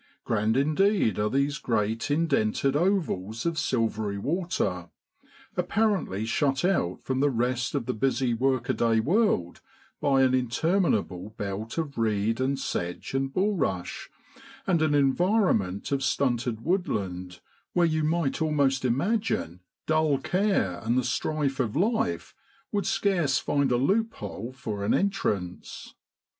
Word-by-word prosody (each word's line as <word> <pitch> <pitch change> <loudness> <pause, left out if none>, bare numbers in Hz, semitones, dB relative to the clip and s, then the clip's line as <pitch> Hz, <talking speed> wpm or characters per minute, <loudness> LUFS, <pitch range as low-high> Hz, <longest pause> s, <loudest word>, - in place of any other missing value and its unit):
Grand 110 +1 +1
indeed 155 - +2
are 105 0 +1
these 140 +3 0
great 110 0 -1
indented 140 -4 +1
ovals 145 - 0
of 165 -1 0
silvery 110 -6 -1
water, 100 - -2 0.7
apparently 200 - 0
shut 135 +5 +1
out 135 - +1
from 130 0 -1
the 145 +1 +3
rest 125 +1 -1
of 135 -5 -1
the - - -1
busy 130 +1 0
workaday 120 -2 +1
world 150 - +1 0.4
by 135 -2 +3
an 130 -1 +3
interminable 125 - 0
belt 105 +5 -4
of 150 -6 -3
reed 110 +1 +1
and 135 +1 +1
sedge 90 -7 -4
and 135 0 0
bulrush, 165 - -1 0.6
and 175 -4 +2
an 155 -2 +2
environment 140 - +2
of 140 -1 +1
stunted 120 -3 0
woodland, 95 - -2 0.3
where 175 -1 +4
you 155 -1 +1
might 160 -2 0
almost 140 -4 +2
imagine 135 - 0 0.3
dull 155 -2 +2
care 180 - 0
and 115 +3 +1
the 130 - +2
strife 140 +2 -1
of 115 -5 -1
life 190 - 0 0.4
would 200 -1 -1
scarce 180 -7 +1
find 140 -2 +1
a 120 - +3
loop 215 - +1
hole 105 +3 -6
for 110 -6 -5
an 100 - +2
entrance. 105 - -2
135 Hz, 130 wpm, -27 LUFS, 110-160 Hz, 0.7 s, where